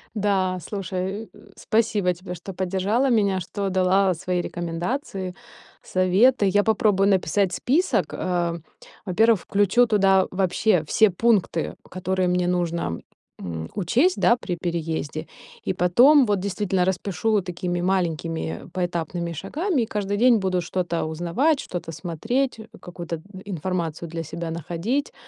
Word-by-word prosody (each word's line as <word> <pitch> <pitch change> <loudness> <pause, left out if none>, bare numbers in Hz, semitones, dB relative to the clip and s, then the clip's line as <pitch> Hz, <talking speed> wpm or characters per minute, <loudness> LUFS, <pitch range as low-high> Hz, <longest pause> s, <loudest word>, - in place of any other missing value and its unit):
Да, 190 -3 +1
слушай, 195 +3 -4
э, - - -17
спасибо 210 -4 +1
тебе, 180 +1 -8
что 180 +3 -8
поддержала 195 +8 0
меня, 200 -5 +2
что 195 +2 -3
дала 190 +1 +3
свои 180 +1 -2
рекомендации, 180 +3 -4 0.5
советы. 200 +5 +3
Я 205 +1 +3
попробую 205 -3 +3
написать 190 0 +1
список. 330 - +1
А, 175 -2 -1 0.5
во-первых, 220 +2 +3
включу 205 +4 +3
туда 195 -4 +3
вообще 185 -1 +2
все 220 +6 +4
пункты, 195 -4 +1
которые 185 0 -1
мне 180 0 +1
нужно, 170 - -1 0.4
м, 80 -2 -5
учесть, 245 - +2
да, 235 - +5
при 185 -7 -4
переезде, 165 -2 -3 0.4
и - - -1
потом 245 - +5
вот 205 -3 +1
действительно 190 -1 0
распишу 200 +3 0
такими 175 0 -3
маленькими 165 - -1
поэтапными 175 -1 -2
шагами, 290 - -1
и - - -2
каждый 205 -2 -2
день 240 +1 +5
буду 190 -3 0
что-то 175 -1 -2
узнавать, 175 - +1
что-то 175 -2 -5
смотреть, 225 - -2 0.2
какую-то 170 -2 -6 0.2
информацию 170 -3 -3
для 165 0 -4
себя 165 +2 -5
находить. 170 - -2
185 Hz, 130 wpm, -24 LUFS, 175-205 Hz, 0.5 s, да